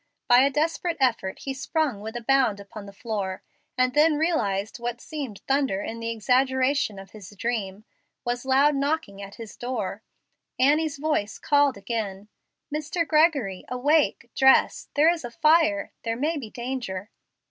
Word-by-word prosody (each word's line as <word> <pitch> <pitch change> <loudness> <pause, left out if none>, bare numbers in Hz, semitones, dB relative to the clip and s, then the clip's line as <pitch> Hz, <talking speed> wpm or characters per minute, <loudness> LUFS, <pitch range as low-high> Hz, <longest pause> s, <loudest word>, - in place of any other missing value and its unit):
By 245 0 +7
a 275 +2 +5
desperate 325 +4 -1
effort 230 -8 +1
he 270 - -3
sprung 275 -4 -1
with 220 +2 -7
a 240 - -5
bound 255 -5 +2
upon 200 +1 -10
the - - -9
floor, 200 -3 -4 0.3
and 255 0 +2
then 300 +1 +4
realized 220 - 0
that - - -20
what 240 0 -3
seemed 275 -10 -6
thunder 270 -7 +1
in 230 - -5
the 230 0 -3
exaggeration 255 +1 +1
of 195 0 -11
his 205 -4 -11
dream 215 -3 -3 0.4
was 240 0 -2
loud 270 +3 +4
knocking 280 -8 -2
at 200 0 -9
his 225 -3 -9
door. 250 +1 -4 0.6
Annie's 295 +3 +2
voice 295 -8 -1
again - - -26
called, 230 -8 0 0.6
"Mr. 335 +3 -2
Gregory, 295 - +2
awake, 255 -1 +1
dress. 265 0 +4
There 300 +2 +5
is 335 - -7
a 240 - -5
fire. 305 -4 +3
There 230 -1 -2
may 305 +6 0
be 260 -8 -6
danger." 235 -5 -5
250 Hz, 160 wpm, -25 LUFS, 215-290 Hz, 0.6 s, By